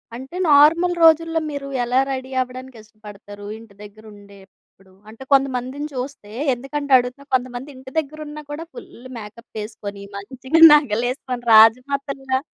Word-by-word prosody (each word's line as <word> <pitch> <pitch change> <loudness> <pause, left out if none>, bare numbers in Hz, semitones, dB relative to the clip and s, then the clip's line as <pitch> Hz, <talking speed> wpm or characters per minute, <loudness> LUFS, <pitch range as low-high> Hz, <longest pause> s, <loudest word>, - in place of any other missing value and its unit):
అంటే 265 +8 -9
నార్మల్ 330 +5 +5
రోజుల్లో 325 0 +4
మీరు 280 -1 -6 0.2
ఎలా 250 +2 +1
రెడీ 260 0 -5
అవ్వడానికి 255 -1 -8
ఇష్టపడతారు? 205 -1 -13
ఇంటి 225 -3 -16
దగ్గెర 210 +1 -14
ఉండేప్పుడు, 195 -1 -20 0.2
అంటే 230 +4 -12
కొంతమందిని 270 +2 0
చూస్తే, 250 -5 -7 0.2
ఎందుకంటే 280 +3 -6
అడుగుతున్నా 250 +3 -4
కొంతమంది 255 +2 -4
ఇంటి 260 0 -12
దగ్గెరున్నా 300 0 -8
కూడా 320 +3 -6
ఫుల్ల్ 250 +2 -12
మేకప్ 225 +1 -12
ఏసుకొని 205 -2 -9
మంచిగా 260 +9 -2
నగలేసుకొని 250 -1 0
రాజమాతల్లా 265 +4 +3
255 Hz, 125 wpm, -20 LUFS, 220-280 Hz, 0.2 s, నార్మల్